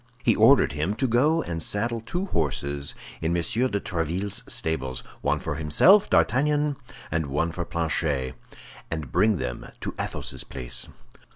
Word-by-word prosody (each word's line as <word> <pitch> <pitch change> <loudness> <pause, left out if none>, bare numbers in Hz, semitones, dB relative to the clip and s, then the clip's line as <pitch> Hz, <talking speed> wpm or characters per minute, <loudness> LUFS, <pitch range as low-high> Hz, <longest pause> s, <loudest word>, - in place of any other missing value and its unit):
He 115 - +4
ordered 115 - +6
him 80 +8 -1
to 130 - 0
go 150 +8 +3
and 85 -1 -4
saddle 115 +6 -1
two 175 - -3
horses 70 - -2 0.3
in 85 +2 +1
M. 85 - 0
de 110 +1 0
Tréville's 90 +2 -2
stables—one 65 -5 -2
for - - -3
himself, 160 - +5
D'Artagnan, 145 +3 +2 0.4
and 80 -1 0
one 75 +4 0
for 90 - -3
Planchet—and 75 -2 -3
bring 110 - +3
them 60 -4 -4
to - - -3
Athos's - - -3
place. 60 -2 -5
85 Hz, 135 wpm, -26 LUFS, 75-115 Hz, 0.4 s, ordered